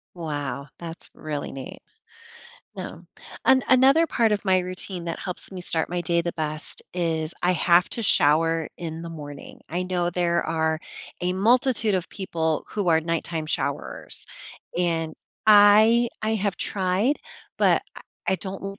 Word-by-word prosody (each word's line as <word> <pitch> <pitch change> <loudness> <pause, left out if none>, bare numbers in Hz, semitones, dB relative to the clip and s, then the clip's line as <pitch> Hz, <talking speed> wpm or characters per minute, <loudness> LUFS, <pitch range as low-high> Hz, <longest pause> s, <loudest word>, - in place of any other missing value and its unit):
Wow. 145 -5 -4
That's 170 -1 -8
really 150 -2 -5
neat. 135 -1 -8 1.0
No. - - -7 0.4
An 260 0 +6
another 270 +6 +6
part 230 -7 +2
of 210 - -1
my 190 -1 +4
routine 180 0 -5
that 170 -1 -4
helps 180 -2 -6
me 190 -2 -7
start 165 -2 0
my 175 0 -1
day 170 +1 +2
the 170 0 -2
best 155 -1 -4
is 165 -2 -1
I 180 - +3
have 175 0 +4
to 230 - -3
shower 165 -2 +3
in 165 -1 -6
the 170 - -6
morning. 145 -3 -9
I 175 +3 -2
know 180 -1 -1
there 170 -1 +1
are 160 0 0 0.4
a 180 0 0
multitude 225 +2 +3
of 180 -3 -1
people 160 -5 -2
who 205 -4 -2
are 160 -1 +5
nighttime 165 -1 -2
showerers. - - -3 0.5
And 165 -3 0 0.3
I 215 +3 +7
I 220 +1 +1
have 200 -2 -1
tried, 195 +8 0 0.4
but - - +4
I - - -9 0.3
I 190 - +3
don't 195 +2 -6
175 Hz, 155 wpm, -25 LUFS, 160-200 Hz, 1.0 s, I